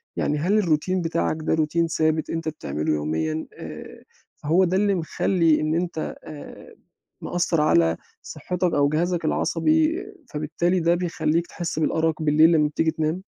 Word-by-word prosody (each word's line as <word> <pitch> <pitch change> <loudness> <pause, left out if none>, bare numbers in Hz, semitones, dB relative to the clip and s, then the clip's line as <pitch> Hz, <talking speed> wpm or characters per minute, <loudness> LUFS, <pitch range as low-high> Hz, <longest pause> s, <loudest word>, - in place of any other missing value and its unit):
يعني 150 - 0
هل 185 +8 +1
الروتين 180 0 +1
بتاعك 155 - -1
ده 155 - 0
روتين 160 +1 +1
ثابت 155 -1 0
أنت 165 -1 -2
بتعملُه 75 - -3
يوميًا 80 +1 -2
آآ، - - -10 0.3
فهو 165 +6 +2
ده 185 +1 +1
اللي 200 -1 +2
مخلّي 165 -1 +1
إن 155 +1 0
أنت 170 -2 -3
آآ، 150 -2 -11 0.5
مأثّر 170 -2 0
على 85 - +3 0.2
صحّتك 180 -1 -3
أو 145 0 +3
جهازك 170 +2 -1
العصبي، 315 - +1 0.2
فبالتالي 170 +4 -1
ده 170 +1 +2
بيخلّيك 170 -1 -1
تحس 175 -3 -4
بالأَرَق 160 0 0
بالليل 155 +2 +5
لمّا 150 -2 +3
بتيجي 160 +2 0
تنام؟ 160 +3 -2
160 Hz, 150 wpm, -24 LUFS, 150-175 Hz, 0.5 s, بالليل